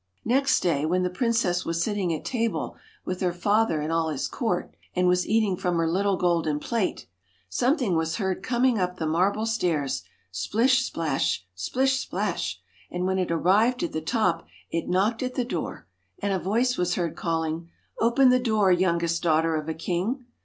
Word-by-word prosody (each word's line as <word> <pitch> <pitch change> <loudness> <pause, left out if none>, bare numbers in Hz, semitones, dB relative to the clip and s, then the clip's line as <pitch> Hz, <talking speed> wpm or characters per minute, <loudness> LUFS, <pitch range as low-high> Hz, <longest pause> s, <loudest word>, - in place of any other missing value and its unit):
Next 265 +3 +3
day, 165 -5 +1
when 180 +4 +1
the 180 - -1
princess 200 -4 +1
was 165 0 -1
sitting 200 -4 -1
at 160 - -4
table 230 -3 -1 0.3
with 185 0 -4
her 180 -2 +2
father 200 -1 +1
and 155 +2 -2
all 165 -1 +1
his 150 -4 -2
court, - - -2 0.2
and 180 0 +2
was 180 0 +2
eating 215 -3 +2
from 180 -1 -1
her 165 -1 +1
little 195 +3 +1
golden 165 -4 +1
plate, 225 +2 -2 0.4
something 245 - +1
was 160 0 0
heard 190 -3 -2
coming 245 +1 +2
up 180 0 -1
the 160 - -2
marble 185 +7 +1
stairs, 165 - 0 0.3
splish, 230 - +2
splash! 155 - -1
splish, 265 - 0
splash! - - -2 0.3
and 180 +1 -2
when 190 0 +1
it 180 - -1
arrived 205 +9 +3
at - - -2
the 160 - -3
top, 170 -2 0 0.2
it 165 - -2
knocked 205 +6 +1
at 255 -1 -3
the 250 - 0
door, 170 - -4 0.3
and 200 -1 -1
a 190 - 0
voice 235 +8 +1
was 180 0 +1
heard 170 -3 -2
calling: 165 0 -2
* - - -21
Open 240 +3 +5
the 255 0 +5
door, 215 -6 +2
youngest 170 -2 +1
daughter 160 0 +2
of 155 0 -3
a - - -1
king 190 - -2
180 Hz, 185 wpm, -26 LUFS, 165-225 Hz, 0.4 s, Open